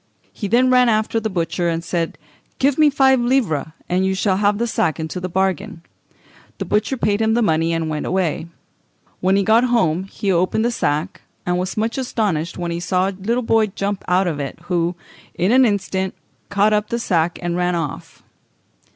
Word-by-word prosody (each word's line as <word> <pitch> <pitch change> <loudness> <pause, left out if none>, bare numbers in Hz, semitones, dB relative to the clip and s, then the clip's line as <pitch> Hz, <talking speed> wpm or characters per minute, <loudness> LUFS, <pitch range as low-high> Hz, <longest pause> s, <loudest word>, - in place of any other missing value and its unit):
He 205 - -4
then 250 +5 +3
ran 250 -1 +5
after 220 +1 +1
the 220 0 -2
butcher, 175 -1 -1
and 165 0 -2
said, 165 -1 -2 0.4
"Give 275 +1 +2
me 305 -1 +6
five 265 -2 +4
livres, 240 - +1 0.2
and 180 +1 +1
you 190 0 +1
shall 190 -1 +1
have 205 0 +2
the 235 - 0
sack 220 -8 0
into 160 +3 -4
the 180 +1 -4
bargain." 190 0 -1 0.7
The - - -4
butcher 210 +5 0
paid 210 -2 +1
him 220 0 +2
the 240 - +2
money, 165 -3 +1
and 165 -1 -1
went 155 -1 -3
away. 175 -3 -1 0.7
When 190 +1 +2
he 200 - +2
got 225 +5 +4
home 190 -8 +1
he 195 0 -2
opened 185 +5 +1
the 240 - +1
sack, 155 -5 -2 0.2
and 180 0 0
was 185 +3 -3
much 225 +4 -1
astonished 200 -10 -1
when 175 -1 -3
he 170 - -2
saw 185 +2 +1
a - - -3
little 220 +6 -2
boy 225 -1 +3
jump 200 0 -3
out 185 +2 +3
of 160 -5 -2
it, 140 -1 -5
who, 175 0 -1 0.4
in 185 +5 +1
an 260 +1 +6
instant, 190 -3 -1 0.3
caught 200 +2 +3
up 210 0 0
the 235 - -1
sack 175 -7 0
and 175 -1 -2
ran 180 0 0
off. 165 -5 -5
190 Hz, 200 wpm, -20 LUFS, 175-220 Hz, 0.7 s, me